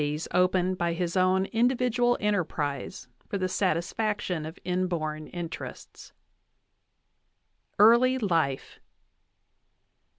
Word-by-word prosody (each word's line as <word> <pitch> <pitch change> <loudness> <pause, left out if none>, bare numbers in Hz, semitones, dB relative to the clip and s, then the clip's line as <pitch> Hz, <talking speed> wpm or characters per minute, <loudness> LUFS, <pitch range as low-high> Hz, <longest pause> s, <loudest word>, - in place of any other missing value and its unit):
VIII 150 +1 -2
opened 180 0 +2
by 170 -1 0
his 170 0 -2
own 185 +1 +3
individual 245 0 +2
enterprise 155 -11 -2 0.2
for 200 - -3
the 185 -1 -1
satisfaction 185 -1 -1
of 160 - -9
inborn 170 -4 -2
interests. 175 -2 -8 1.7
EARLY 235 +5 +6
LIFE. 165 - -1
185 Hz, 90 wpm, -27 LUFS, 165-210 Hz, 1.7 s, EARLY